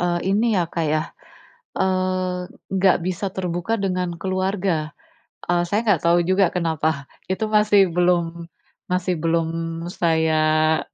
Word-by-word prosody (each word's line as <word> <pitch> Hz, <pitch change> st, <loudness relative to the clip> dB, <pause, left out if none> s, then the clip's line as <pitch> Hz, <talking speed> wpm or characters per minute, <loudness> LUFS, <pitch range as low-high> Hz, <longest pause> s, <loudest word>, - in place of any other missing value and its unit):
eee, 175 Hz, 0 st, 0 dB
ini 220 Hz, +1 st, +2 dB
ya 180 Hz, -, +2 dB
Kak 165 Hz, -1 st, -3 dB
ya, 155 Hz, +1 st, +1 dB, 0.7 s
eee, 185 Hz, -1 st, -1 dB, 0.2 s
nggak 190 Hz, -1 st, +4 dB
bisa 185 Hz, +2 st, -2 dB
terbuka 185 Hz, +3 st, -2 dB
dengan 180 Hz, -3 st, -2 dB
keluarga. 185 Hz, -3 st, -1 dB, 0.6 s
Eee, 175 Hz, 0 st, +2 dB
saya 210 Hz, +6 st, 0 dB
nggak 205 Hz, -8 st, +2 dB
tahu 175 Hz, +1 st, +4 dB
juga 185 Hz, +2 st, +3 dB
kenapa. 160 Hz, -4 st, -1 dB, 0.2 s
Itu 215 Hz, +3 st, -2 dB
masih 210 Hz, -3 st, +4 dB
belum 170 Hz, -1 st, 0 dB, 0.4 s
masih 180 Hz, -1 st, -1 dB
belum 165 Hz, 0 st, -1 dB
saya 155 Hz, -2 st, +2 dB
175 Hz, 125 wpm, -22 LUFS, 165-190 Hz, 0.7 s, nggak